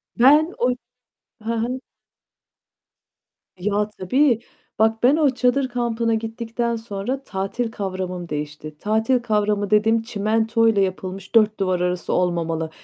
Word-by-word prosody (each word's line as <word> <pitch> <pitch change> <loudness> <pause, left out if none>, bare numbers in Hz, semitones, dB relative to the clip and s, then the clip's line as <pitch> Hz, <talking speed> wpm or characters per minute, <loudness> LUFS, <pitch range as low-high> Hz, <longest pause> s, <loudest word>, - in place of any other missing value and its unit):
Ben 300 +8 +5
o 245 - +3 0.7
Hı 230 +1 -2
hı. 245 +3 -2 1.8
Ya, 205 +3 0
tabii 235 +5 +2 0.4
bak, 220 +1 +2
ben 260 +4 +6
o 300 -3 +4
çadır 260 +1 +1
kampına 235 -2 0
gittikten 230 +1 -2
sonra 225 +4 -4
tatil 200 +3 -3
kavramım 185 -4 -4
değişti. 150 0 -6
Tatil 220 +4 +1
kavramı 210 -3 0
dediğim 220 +2 +3
çimentoyla 225 0 +1
yapılmış 190 +1 -4
dört 215 -2 +4
duvar 185 -2 +1
arası 180 0 -1
olmamalı. 165 -2 0
220 Hz, 115 wpm, -22 LUFS, 190-235 Hz, 1.8 s, ben